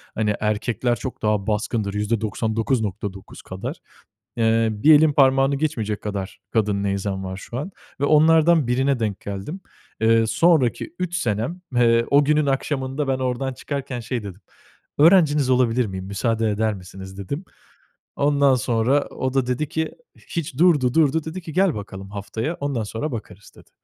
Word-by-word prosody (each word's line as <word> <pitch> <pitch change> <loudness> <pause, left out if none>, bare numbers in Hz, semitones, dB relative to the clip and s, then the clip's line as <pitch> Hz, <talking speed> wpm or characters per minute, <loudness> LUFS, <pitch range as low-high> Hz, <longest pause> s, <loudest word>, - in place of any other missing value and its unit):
hani 105 -1 0
erkekler 115 +3 0
çok 125 +4 -7
daha 105 -1 0
baskındır, 105 -1 -1
%99.9 110 -1 -2
kadar. - - -6 0.6
Iıı, 110 -2 +1
bir 155 - +8
elin 155 0 +4
parmağını 135 0 +4
geçmeyecek 115 -8 -2
kadar 100 -2 -5
kadın 105 -3 +1
neyzen 100 -1 -2
var 95 0 -5
şu 120 - -7
an 175 +8 -4 0.3
ve - - +3
onlardan 160 0 +5
birine 130 +1 +1
denk 105 -3 -2
geldim. 100 - -6 0.4
Iıı, 115 0 +4
sonraki 160 +2 +2
3 175 -1 -2
senem, 120 - -2
ııı, 115 -1 +3
o 145 +1 +6
günün 150 0 +2
akşamında 135 +1 -1
ben 130 -1 0
ordan 130 +1 -2
çıkarken 135 -2 -5
şey 120 -1 -4
dedim: 100 0 -9 0.6
"Öğrenciniz 150 -5 +5
olabilir 125 -1 +3
miyim, 95 -2 -6
müsaade 110 +3 0
eder 110 +1 0
misiniz?" 95 0 -10
dedim. 140 - -5 0.7
Ondan 140 -1 +3
sonra 125 +3 +1
o 130 0 -4
da 130 -2 +2
dedi 125 +4 -1
ki 160 +2 -2 0.4
hiç, 150 -5 -4
durdu, 150 -8 +4
durdu. 160 -1 +3
Dedi 160 +4 -6
ki: 165 - -8
"Gel 185 -2 +2
bakalım 95 -1 -8
haftaya, 110 - -4
ondan 140 -5 -1
sonra 120 +7 -4
bakarız" 105 -3 -8
dedi. - - -18
120 Hz, 155 wpm, -22 LUFS, 105-145 Hz, 0.7 s, bir